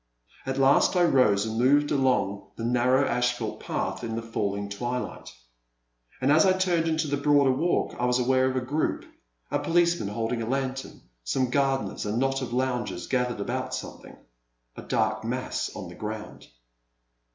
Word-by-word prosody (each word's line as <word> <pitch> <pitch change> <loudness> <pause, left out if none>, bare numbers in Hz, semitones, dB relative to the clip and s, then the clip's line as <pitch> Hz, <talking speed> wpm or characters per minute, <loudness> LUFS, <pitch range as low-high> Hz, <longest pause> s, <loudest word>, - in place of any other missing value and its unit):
At 135 0 -2
last 135 +6 +4
I 180 - +4
rose 110 -10 +4
and 110 0 -3
moved 145 +4 +3
along 115 -8 +1
the 115 - -6
narrow 125 +3 +3
asphalt 125 0 -1
path - - -3
in 115 -1 -3
the 115 - -4
falling 100 -3 -2
twilight. 120 +5 -4 0.9
And 135 +2 +2
as 155 +1 +6
I 190 - +4
turned 180 -3 +1
into 160 -1 0
the 145 0 0
broader 145 -1 +4
walk, 165 +7 0
I 125 - +1
was 125 0 +2
aware 130 +1 +2
of 130 - -3
a 130 - 0
group, 145 +5 -1 0.5
a - - +1
policeman 170 -7 +2
holding 115 +3 -2
a 115 - -3
lantern, 135 0 -3 0.2
some 125 - 0
gardeners, 135 -4 0
and 105 - -1
a - - 0
knot 135 +1 0
of 125 - -4
loungers 120 -8 -2
gathered 125 -3 -1
about 130 +4 -3
something, - - -9 0.3
— - - -49
a - - -8
dark - - 0
mass - - -2
on - - -6
the - - -10
ground. 110 0 -7
130 Hz, 175 wpm, -26 LUFS, 115-135 Hz, 0.9 s, as